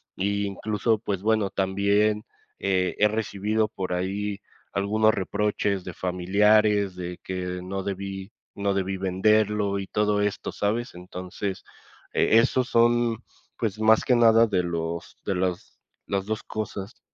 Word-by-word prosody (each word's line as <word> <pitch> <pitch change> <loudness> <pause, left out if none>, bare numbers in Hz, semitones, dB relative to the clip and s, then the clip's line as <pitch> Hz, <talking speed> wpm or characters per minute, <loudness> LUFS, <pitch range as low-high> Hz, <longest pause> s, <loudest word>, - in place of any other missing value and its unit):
incluso, 100 +2 0
pues 100 -3 -3
bueno, 110 -3 +2
también, 100 +2 +1 0.3
eh, 95 -2 +1
he 105 - +6
recibido 110 0 0
por 95 -4 -4
ahí 100 +3 -2 0.3
algunos 110 +2 +3
reproches 100 0 -1
de 90 - -6
familiares 100 +2 +3
de 90 -1 -6
que 90 -1 -4
no 95 +1 -3
debí 100 +1 -5 0.2
no 100 -1 0
debí 95 0 -1
venderlo 100 +2 +2
y 95 - -5
todo 105 -1 +1
esto, 105 0 -2
¿sabes? 115 +4 -1
Entonces 90 +2 -6 0.5
e 110 - +4
esos 130 +1 +1
son 120 0 +3 0.3
pues 110 -2 -2
más 110 0 +5
que 125 - +4
nada 115 -1 +6
de 95 -4 +1
los 85 -1 -4
de 100 - 0
las 90 -1 -3 0.3
las 100 -1 -1
dos 110 0 -3
cosas. 105 0 -6
100 Hz, 135 wpm, -25 LUFS, 95-110 Hz, 0.5 s, he